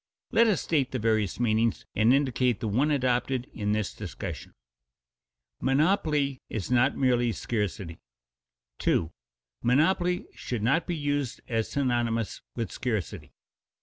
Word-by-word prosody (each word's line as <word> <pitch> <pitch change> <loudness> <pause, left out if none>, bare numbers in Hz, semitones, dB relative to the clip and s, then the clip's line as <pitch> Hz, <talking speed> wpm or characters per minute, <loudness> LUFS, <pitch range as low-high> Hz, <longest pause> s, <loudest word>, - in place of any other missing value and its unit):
Let 230 -1 +5
us 210 -5 +2
state 145 -6 +1
the 130 - -2
various 110 -3 0
meanings 115 -1 +1
and 110 +3 +4
indicate 130 -4 +2
the 110 - -2
one 125 +9 +2
adopted 130 -2 +1
in 105 -2 -1
this 105 -2 -1
discussion. - - -7 1.0
[Sidenote: 135 0 +1
Monopoly 150 -5 +2
is 110 +1 -4
not 125 0 +3
merely 120 -2 +2
scarcity] 105 -7 -3 0.8
2. 80 0 +1 0.5
_Monopoly 175 +8 +2
should 120 -4 -4
not 140 +8 +2
be 175 - -1
used 145 -4 -2
as 115 -2 -1
synonymous 120 -5 0
with 115 -5 -3
scarcity. 110 -9 -3
125 Hz, 130 wpm, -28 LUFS, 110-140 Hz, 1.0 s, Let